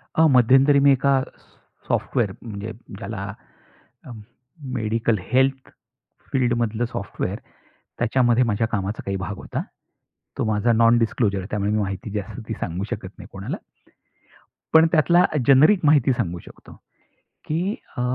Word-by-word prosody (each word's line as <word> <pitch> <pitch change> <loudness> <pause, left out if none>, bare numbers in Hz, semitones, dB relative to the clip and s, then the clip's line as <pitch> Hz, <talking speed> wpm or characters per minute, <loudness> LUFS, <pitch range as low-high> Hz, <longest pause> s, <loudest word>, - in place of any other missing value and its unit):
अ, 160 - +5
मध्यंतरी 135 +3 +5
मी 140 0 +5
एका 135 0 +3
सॉ - - -26
सॉफ्टवेअर 105 -5 -2
म्हणजे 110 -1 -7 0.3
ज्याला 100 -1 -6 0.7
अ, 125 - -10 0.6
मेडिकल 115 0 0
हेल्थ 130 +1 +1 0.6
फील्डमधलं 120 -3 0
सॉफ्टवेअर 100 -5 -4 0.6
त्याच्यामध्ये 120 0 +3
माझ्या 115 -1 0
कामाचा 105 -1 -3
काही 100 - -2
भाग 95 +1 -5
होता. - - -5 0.8
तो - - 0
माझा 110 +2 +1
नॉन 115 +1 +5
डिस्क्लोजर 100 -4 0
त्यामुळे 105 0 -1
मी 110 - +1
माहिती 100 +1 -4
जास्त 105 +3 -5
ती - - -3
सांगू 90 +3 -3
शकत - - -5
नाही - - -11
अ, - - -15
कोणाला. - - -5 1.2
पण 160 +1 +8
त्यातला 175 +2 +4 0.2
जेनेरिक 150 +9 +6
माहिती 145 -3 +4
सांगू 90 -7 -2
शकतो - - -15 0.7
की 180 +7 -1 0.2
अ, - - -3
115 Hz, 135 wpm, -22 LUFS, 105-135 Hz, 1.2 s, पण